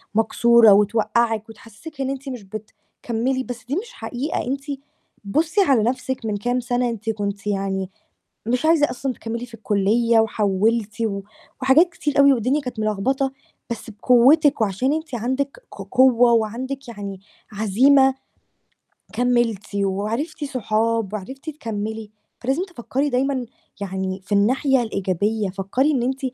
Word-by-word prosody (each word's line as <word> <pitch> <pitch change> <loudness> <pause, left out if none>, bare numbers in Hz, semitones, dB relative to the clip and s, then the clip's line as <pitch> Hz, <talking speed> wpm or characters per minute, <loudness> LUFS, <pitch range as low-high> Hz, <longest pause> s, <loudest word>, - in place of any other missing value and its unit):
مكسورة 225 0 +5
وتوقّعِك 220 +2 +1
وتحسسِك 230 +7 -11
إن 265 - -1
أنتِ 275 0 -5
مش 245 -5 -6
بتكمّلي، 225 +5 -4
بس 240 -2 -8
دي 275 +4 -2
مش 475 +6 -4
حقيقة. 275 +7 -3
أنتِ 275 +1 -2 0.6
بُصّي 315 - +1
على 270 - +3
نَفسِك 255 0 -2
من 210 -2 -1
كام 245 +4 -1
سنة، 245 0 0
أنتِ 225 -1 -5
كنتِ 205 -1 -3
يعني 195 -1 -1 0.6
مش 250 +6 0
عايزة 315 -3 +4
أصلًا 255 +1 -3
تكمّلي 230 +2 -5
في 235 - -20
الكلية 225 +2 +2
وحوّلتِ، 215 +1 0
و 200 -3 -1 0.4
وحاجات 290 +7 +5
كتير 295 -4 -2
أوي 280 0 +7
والدنيا 255 +5 0
كانت 250 -4 -6
ملخبطة، 260 +6 0 0.4
بس 235 0 -5
بقوتِك 255 +6 +4
وعشان 220 +8 +1
أنتِ 315 -5 -4
عندِك 260 - -2
ق - - -9
قوة 245 -2 +5
وعندِك 250 +5 -2
يعني 200 -4 -7 0.3
عزيمة، 265 +7 +4 1.0
كمّلتِ 240 -4 0
وعرفتِ 220 - -2
صحاب 225 -4 -1
وعرفتِ 265 - -6
تكمّلي، 220 -5 -5 0.3
فلازم 270 +8 0
تفكري 290 - -2
دايمًا 260 -1 0 0.3
يعني 190 -1 -3
في 205 - -8
الناحية 255 +5 +3
الإيجابية، 200 0 -1
فكري 200 +10 0
إن 250 -4 0
أنتِ 265 +2 -1
235 Hz, 135 wpm, -22 LUFS, 210-265 Hz, 1.0 s, أوي